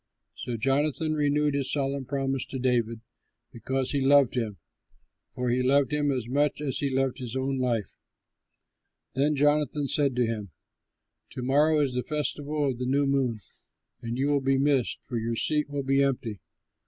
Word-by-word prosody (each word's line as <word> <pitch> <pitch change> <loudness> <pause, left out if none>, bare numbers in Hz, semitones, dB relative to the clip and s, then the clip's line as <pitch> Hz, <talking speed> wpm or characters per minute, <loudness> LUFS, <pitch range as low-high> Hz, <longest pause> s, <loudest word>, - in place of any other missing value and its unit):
So 120 -2 -5
Jonathan 145 +5 +1
renewed 150 0 +1
his 140 -2 0
solemn 140 -1 -1
promise 135 0 -1
to 135 - -5
David, 120 -3 0 0.5
because 130 +3 -2
he 140 - 0
loved 140 -1 +4
him; 110 -5 -2 0.8
for 125 -1 -1
he 125 +1 +1
loved 140 +2 +2
him 145 -1 +1
as 125 -4 -2
much 145 +4 +1
as 140 -3 -2
he 140 - 0
loved 135 0 0
his 125 -1 -6
own 135 0 -1
life. 120 -5 -1 1.2
Then 145 +3 +1
Jonathan 145 0 +2
said 140 -2 +1
to 125 -1 +2
him, 110 -3 -4 0.8
"To 125 - -5
morrow 150 +4 +3
is 135 -3 0
the 125 - 0
festival 150 0 -1
of 125 -3 -2
the 125 - -2
New 140 +2 +2
Moon 130 -5 0 0.6
and 120 0 -4
you 140 +2 +1
will 140 -1 +2
be 135 0 +2
missed, 135 -3 +2
for 120 - -4
your 115 +1 -2
seat 150 +4 0
will 145 -1 -3
be 135 +1 +2
empty. 125 -7 -1
135 Hz, 175 wpm, -27 LUFS, 125-145 Hz, 1.2 s, loved